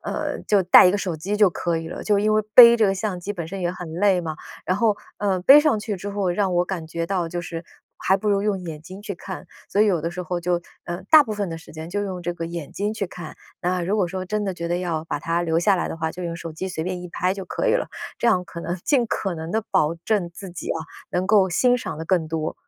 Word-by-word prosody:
呃， - - -3
就 200 -3 +4
带 180 +1 +8
一 - - +5
个 205 - +1
手 185 -4 -2
机 185 +7 -3
就 205 -3 +5
可 170 0 -1
以 165 0 -4
了， - - -6
就 210 -2 +2
因 215 +1 +2
为 215 - +4
背 235 -1 +11
这 215 - +5
个 195 - +1
相 190 -2 -3
机 190 - -5
本 175 -5 -4
身 195 +2 -6
也 175 - 0
很 180 -3 -7
累 185 +1 +2
嘛。 155 -2 -4 0.3
然 185 - +1
后， 215 -2 +3 0.2
呃， 195 -2 +1
背 275 +11 +8
上 295 -8 +2
去 210 -1 -3
之 195 +3 -6
后 200 -2 -1
让 185 0 0
我 175 0 +3
感 180 -3 -5
觉 165 +1 -3
到 180 -2 -1
就 175 +1 -3
是 170 -1 -6 0.3
还 190 - +2
不 210 - -2
如 200 -1 +2
用 205 -3 0
眼 160 -4 -7
睛 185 +4 -10
去 205 -1 -5
看， 190 +1 -8 0.2
所 205 - +1
以 215 - +6
有 180 -5 +2
的 170 - -1
时 180 - -6
候 175 +1 -3
就 175 0 0 0.2
呃， 175 +1 -5
大 310 -2 +9
部 220 - -5
分 205 -3 -2
的 165 - -5
时 165 - -13
间 160 +1 -7
就 205 +3 -2
用 190 -3 -4 0.3
眼 170 -4 -6
睛 205 +2 -2
去 210 -2 -3
看。 175 -3 -9 0.3
那 180 +1 0
如 195 +5 0
果 195 - +2
说 185 +2 -4
真 210 +2 -1
的 195 - -1
觉 170 -1 -5
得 175 - 0
要 170 -3 -2
把 - - -3
它 170 +1 -1
留 165 -1 +1
下 195 +3 +3
来 175 - -1
的 - - -5
话， 160 -1 -2
就 180 - -7
用 170 -1 -3
手 165 -1 -7
机 185 +5 -5
随 160 -3 -4
便 185 -1 -3
一 180 - -7
拍 180 +2 0
就 195 -1 -6
可 - - -2
以 - - +4
了， - - 0 0.3
这 240 - +2
样 180 -4 +2
可 170 -1 -8
能 175 +2 -3
尽 260 -5 +3
可 195 -4 -2
能 160 +1 -6
地 220 +2 0
保 170 -5 +2
证 175 +2 -1
自 190 +2 -9
己 175 - -7
啊， - - 0 0.3
能 180 +1 -1
够 195 -2 +4
欣 245 +8 +3
赏 230 - -5
得 160 - -5
更 165 -2 +1
多。 160 -1 -2
180 Hz, 305 characters per minute, -23 LUFS, 170-205 Hz, 0.3 s, 背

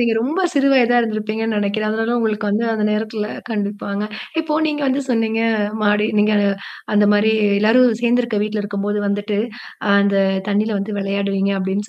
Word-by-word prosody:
நீங்க 235 -1 +2
ரொம்ப 300 +11 -1
சிறு 280 -2 +2
வயதா 245 -2 +4
இருந்திருப்பீங்கன்னு 220 0 -2
நெனைக்கிறேன். 205 +1 -1
அதனால 225 +2 -1
உங்களுக்கு 215 -2 -1
வந்து 215 +3 0
அந்த 215 -1 -1
நேரத்தல 215 0 -2 0.2
கண்டிப்பாங்க. 205 -1 -3 0.4
இப்போ 315 -1 -3
நீங்க 295 -1 -2
வந்து 265 +1 +1
சொன்னீங்க 225 -1 0 0.4
மாடி 210 0 +2
நீங்க 210 +1 +3
அ - - +3 0.4
அந்த 205 0 +4
மாரி 210 +1 +3 0.3
எல்லாரும் 230 +2 +4
சேர்ந்திருக்க 235 -2 +1
வீட்ல 215 0 -2
இருக்கும்போது 205 0 -2
வந்துட்டு, 205 +1 -1 0.5
அ - - 0
அந்த 200 0 +1 0.3
தண்ணீல 210 +1 0
வந்து 205 +1 -4
விளையாடுவீங்க 195 0 -1
அப்படின்னு 195 +3 -2
215 Hz, 160 wpm, -19 LUFS, 205-225 Hz, 0.5 s, வயதா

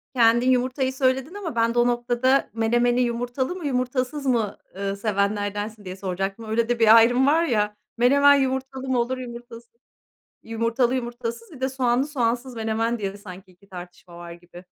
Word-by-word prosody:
Kendin 240 +1 +4
yumurtayı 255 +1 0
söyledin 265 +4 0
ama 385 -10 -6
ben 230 0 +1
de 240 - +1
o 240 - +4
noktada 245 +2 +1
menemeni 240 +2 +1
yumurtalı 245 +5 -2
mı, 360 -4 -7
yumurtasız 255 +2 -2
mı, 230 -6 0 0.2
eee, 195 0 -3
sevenlerdensin 205 0 -2
diye 185 0 -6
soracaktım. 195 +3 -4
Öyle 225 +2 -1
de 240 - 0
bir 225 0 +7
ayrım 245 +4 +5
var 320 +3 +3
ya, 210 -8 0 0.2
menemen 280 +4 +5
yumurtalı 265 0 -2
mı 255 -2 +1
olur, 255 +2 -1
yumurtasız 235 -1 -10 0.7
Yumurtalı, 230 +3 0
yumurtasız, 240 - -5
bir 265 -5 -13
de 265 - 0
soğanlı, 260 +1 0
soğansız 245 -2 -2
menemen 225 +1 -1
diye 195 0 -4
sanki 185 -2 -12
2 185 +2 -24
tartışma 175 -1 -11
var 170 0 -9
gibi. 175 +1 -13
240 Hz, 165 wpm, -23 LUFS, 215-260 Hz, 0.7 s, bir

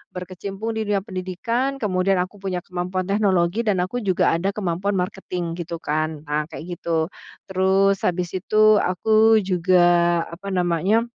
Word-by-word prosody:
berkecimpung 195 +4 -5
di 220 -1 -3
dunia 200 -2 0
pendidikan 220 +7 -2
kemudian 190 -1 +1
aku 190 +3 -11
punya 185 -2 -3
kemampuan 180 +1 -3
teknologi 195 -1 +1
dan 205 -6 +1
aku 215 +7 -3
juga 195 -6 +2
ada 190 +5 -1
kemampuan 195 0 -1
marketing 180 -2 -3
gitu 170 -1 -6
kan. 155 0 -2
Nah, 150 0 -2
kayak 175 +2 -8
gitu, 165 +1 -1 0.3
terus 190 +1 +2
habis 180 -1 -1
itu 215 +2 +4
aku 220 +4 +3
juga 180 -1 +3 0.5
apa 180 +4 -9
namanya 185 +4 +1
185 Hz, 145 wpm, -22 LUFS, 175-205 Hz, 0.5 s, itu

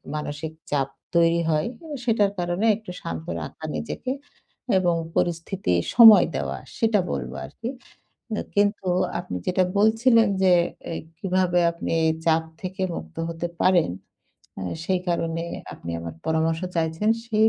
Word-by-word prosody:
মানসিক 150 +1 -4 0.2
চাপ 135 -2 +1 0.3
তৈরি 170 0 +4
হয়। 155 +4 +1 0.2
অ - - -9 0.2
সেটার 210 -4 +3
কারণে 175 +5 0
একটু 215 -4 -9
শান্ত 80 -1 -5 0.2
রাখা 155 - -9
নিজেকে 255 +2 -4 0.7
এবং 175 -2 +2 0.2
পরিস্থিতি 175 - 0 0.2
সময় 225 -3 +10
দেওয়া, - - -2 0.2
সেটা 225 -4 +3
বলবো - - -4
আরকি। 230 +1 -6 0.7
আ - - 0 0.2
কিন্তু 205 -1 +2 0.3
আপনি 90 - -6
যেটা 185 0 +3
বলছিলেন, 225 +2 +5 0.2
যে 185 -1 +6 0.4
এ - - -2 0.2
কিভাবে 185 -1 +1
আপনি 170 - -4 0.3
চাপ 160 0 +3 0.2
থেকে 185 0 -5
মুক্ত 80 0 -8
হতে 170 +1 -3
পারেন? 180 - +4 0.7
আ - - -4 0.2
সেই 185 0 +1
কারণে 165 -1 -1 0.3
আপনি 85 - -8
আমার 85 -1 -6
পরামর্শ 160 +1 +1 0.2
চাইছেন। 165 +6 0 0.2
সেই 220 -1 +4
175 Hz, 135 wpm, -24 LUFS, 160-205 Hz, 0.7 s, সময়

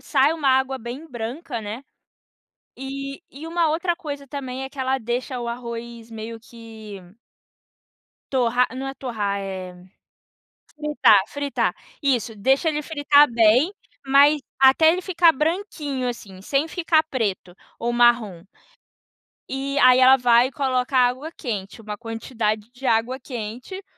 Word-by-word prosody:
sai 280 +1 +2
uma 310 -4 -1
água 265 0 +2
bem 245 +7 -8
branca, 240 +1 -5
né? 220 +5 -7 0.9
E 275 +1 -6
e 290 +4 -10
uma 335 -1 +1
outra 340 +2 0
coisa 285 -5 -7
também 265 -2 -5
é 265 - -7
que 280 - -17
ela 260 0 0
deixa 245 +2 -3
o 235 - -4
arroz 235 -1 -7
meio 225 +1 -7
que 220 -3 -11 1.3
torrar 250 -1 +2
não 270 +1 -4
é 270 - -5
torrar, 210 -7 -3
eh, 190 -2 -6 1.0
fritar 300 -9 +4
fritar. 260 -9 -2 0.3
Isso, 245 -5 0
deixa 265 - +2
ele 300 -1 -2
fritar 290 -1 +4
bem, 235 - +4 0.3
mas 285 +2 +5 0.2
até 270 +4 +6
ele 365 +2 -2
ficar 340 -3 +4
branquinho, 300 -4 -2
assim, 200 -6 -7
sem 275 +8 0
ficar 325 -2 +2
preto 210 - -3 0.2
ou 235 - -2
marrom. 235 -7 +2 1.1
E 275 +1 -2
aí, 255 -1 +7
ela 260 +1 +7
vai 245 0 +4
e - - -15
coloca 260 -1 -1
água 255 +5 +1
quente, 210 - -5
uma 210 -1 -6
quantidade 225 -1 -3
de 255 +2 -7
água 230 +3 +1
quente, 250 - -7
255 Hz, 140 wpm, -23 LUFS, 230-285 Hz, 1.3 s, aí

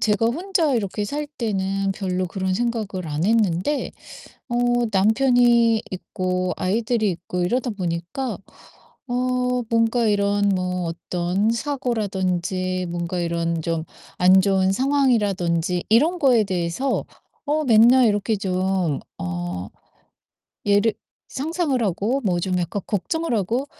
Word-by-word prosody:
제가 215 +1 +2
혼자 325 +2 0
이렇게 210 -2 -1
살 295 +8 -3
때는 195 -3 -1
별로 185 -1 -2
그런 190 +1 -2
생각을 215 -5 -2
안 150 +3 -2
했는데 215 - +1 0.6
어 240 - -3 0.4
남편이 235 +2 +4
있고 185 0 -2
아이들이 220 +2 0
있고 180 +1 -4
이러다 245 +6 0
보니까 185 +5 -3 0.7
어 250 0 0
뭔가 230 +1 +2
이런 205 0 +2
뭐 180 -1 -1
어떤 175 +4 -1
사고라든지 190 - -1
뭔가 170 +1 -3
이런 170 -1 -1
좀 165 0 -2 0.3
안 185 +1 +6
좋은 190 -1 +2
상황이라든지 200 - +1
이런 305 +11 +4
거에 255 -8 +4
대해서 185 +7 -1 0.4
어 305 +2 +1
맨날 240 +1 +6
이렇게 210 +1 +1
좀 185 -5 -1 0.2
어 90 +1 -4 1.0
예를 205 +2 +3 0.3
상상을 295 -2 -1
하고 215 +7 0
뭐 180 -6 +1
좀 185 0 -1
약간 180 +3 -3
걱정을 320 - -1
하고 230 +7 -1
200 Hz, 245 characters per minute, -22 LUFS, 180-240 Hz, 1.0 s, 안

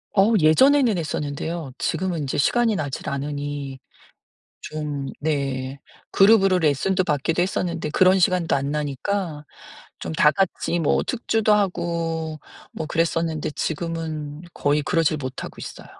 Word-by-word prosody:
어 205 +3 +5
예전에는 245 - +5
했었는데요. 155 -1 -3
지금은 175 0 -1
인제 140 -3 -2
시간이 230 +8 +2
나질 150 -3 -3
않으니 145 -1 -4 0.8
좀 150 -3 -4
네. 140 -3 -2 0.3
그룹으로 195 -2 +5
레슨도 180 +4 +1
받기도 160 +2 0
했었는데 175 -3 -1
그런 185 +4 +4
시간도 180 -3 +2
안 140 +1 -2
나니까 150 +3 -2 0.6
좀 80 - -4
다 150 - +5
같이 185 -2 0
뭐 155 - +2
특주도 220 -3 +1
하고 170 -5 -1 0.3
뭐 160 - -5
그랬었는데 165 -1 0
지금은 160 -1 -4
거의 145 +1 +1
그러지를 155 0 +1
못하고 130 -2 -6
있어요. - - -9
160 Hz, 295 characters per minute, -23 LUFS, 145-180 Hz, 0.8 s, 어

